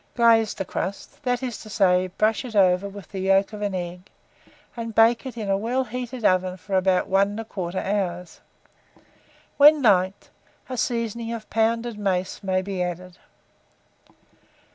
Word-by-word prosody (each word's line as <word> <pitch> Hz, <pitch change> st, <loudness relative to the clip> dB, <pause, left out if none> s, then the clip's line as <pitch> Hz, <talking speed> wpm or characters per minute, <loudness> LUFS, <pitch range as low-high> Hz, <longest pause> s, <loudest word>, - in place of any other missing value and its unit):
Glaze 230 Hz, -2 st, +4 dB
the 190 Hz, -, -4 dB
crust, 195 Hz, +2 st, -5 dB
that 250 Hz, -1 st, -1 dB
is 245 Hz, -4 st, -4 dB
to 215 Hz, -, -11 dB
say, 185 Hz, -3 st, +3 dB
brush 215 Hz, +6 st, 0 dB
it 240 Hz, -4 st, -8 dB
over 190 Hz, 0 st, +3 dB
with 200 Hz, -4 st, -11 dB
the 195 Hz, -, -6 dB
yolk 195 Hz, +2 st, +2 dB
of 210 Hz, -, -7 dB
an 200 Hz, -2 st, -2 dB
egg, 180 Hz, +1 st, -6 dB, 0.7 s
and 230 Hz, -2 st, -6 dB
bake 230 Hz, +3 st, +4 dB
it 250 Hz, -, -8 dB
in 215 Hz, -3 st, -4 dB
a 195 Hz, -, +2 dB
well 240 Hz, +6 st, -1 dB
heated 245 Hz, 0 st, -6 dB
oven 185 Hz, 0 st, +2 dB
for 195 Hz, +1 st, -4 dB
about 185 Hz, -1 st, +2 dB
1 200 Hz, +2 st, +1 dB
1/4 190 Hz, -5 st, -5 dB
hour. 185 Hz, -3 st, -1 dB, 1.3 s
When 295 Hz, 0 st, +7 dB
liked, 190 Hz, -3 st, +2 dB, 0.4 s
a 255 Hz, -, -5 dB
seasoning 230 Hz, -1 st, -2 dB
of 220 Hz, -2 st, -8 dB
pounded 230 Hz, 0 st, 0 dB
mace 185 Hz, -2 st, -1 dB
may 185 Hz, -1 st, 0 dB
be 190 Hz, -1 st, -4 dB
added. 180 Hz, 0 st, -5 dB
205 Hz, 160 wpm, -24 LUFS, 185-230 Hz, 1.3 s, When